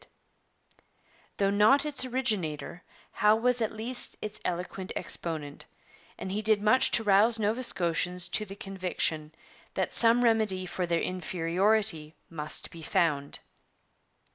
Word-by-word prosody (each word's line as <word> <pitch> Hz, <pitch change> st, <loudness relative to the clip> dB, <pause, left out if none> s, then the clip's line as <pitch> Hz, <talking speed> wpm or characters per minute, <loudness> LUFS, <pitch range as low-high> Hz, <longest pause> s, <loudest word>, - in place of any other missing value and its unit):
But -, -, -24 dB, 0.5 s
though 195 Hz, -1 st, +1 dB
not 215 Hz, +9 st, +4 dB
its 295 Hz, -3 st, -1 dB
originator, 210 Hz, -, -2 dB, 0.3 s
Howe 210 Hz, +1 st, +3 dB
was 245 Hz, +2 st, +2 dB
at 220 Hz, -, 0 dB
least 235 Hz, +3 st, -2 dB
its 215 Hz, 0 st, -6 dB
eloquent 180 Hz, +2 st, -4 dB
exponent, 155 Hz, -3 st, -3 dB, 0.5 s
and 190 Hz, -, -6 dB
he 205 Hz, +2 st, -2 dB
did 215 Hz, 0 st, +3 dB
much 215 Hz, +5 st, +3 dB
to 225 Hz, -, -4 dB
rouse 210 Hz, +3 st, +4 dB
Nova 220 Hz, +3 st, -1 dB
Scotians 180 Hz, -4 st, 0 dB
to 215 Hz, -, 0 dB
the 195 Hz, -1 st, -9 dB
conviction 180 Hz, -6 st, -2 dB, 0.4 s
that -, -, -2 dB
some 235 Hz, +1 st, +5 dB
remedy 215 Hz, -5 st, +2 dB
for 180 Hz, 0 st, -3 dB
their 170 Hz, -1 st, 0 dB
inferiority 180 Hz, -1 st, 0 dB, 0.2 s
must 155 Hz, -2 st, -2 dB
be 165 Hz, -, -11 dB
found. 145 Hz, -3 st, 0 dB
195 Hz, 135 wpm, -28 LUFS, 170-220 Hz, 0.5 s, some